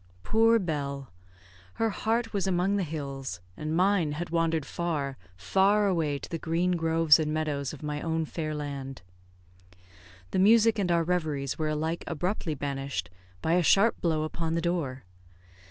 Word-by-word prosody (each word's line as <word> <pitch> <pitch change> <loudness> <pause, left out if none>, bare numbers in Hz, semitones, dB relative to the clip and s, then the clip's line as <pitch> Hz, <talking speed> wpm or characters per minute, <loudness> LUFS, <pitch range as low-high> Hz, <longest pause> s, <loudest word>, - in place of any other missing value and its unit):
Poor 225 - +4
Bell! 140 - -3 0.6
Her 225 -1 +1
heart 225 +3 -1
was 195 -2 0
among 190 +2 +1
the 200 - +1
hills, 140 - -5 0.2
and 155 +6 -3
mine 185 -5 +2
had 170 +3 -5
wandered 165 -3 +1
far, 150 -6 -2 0.2
far 195 - +3
away 165 -7 +1
to - - -8
the 165 - -4
green 170 +3 0
groves 165 -2 +4
and 155 -1 -1
meadows 150 -3 -1
of 150 - -10
my 150 0 -3
own 160 -1 -1
fair 155 -1 -4
land. 140 -5 -6 1.3
The - - 0
music 225 +2 +5
and 180 -3 +1
our 170 -1 +3
reveries 155 -6 -1
were 155 -1 0
alike 160 +2 -2
abruptly 170 -1 -2
banished 135 -10 -4 0.3
by 160 - +2
a 180 - +4
sharp 200 +7 +4
blow 160 -3 +1
upon 160 +1 -2
the - - +1
door. 160 -7 -2
160 Hz, 160 wpm, -28 LUFS, 145-180 Hz, 1.3 s, music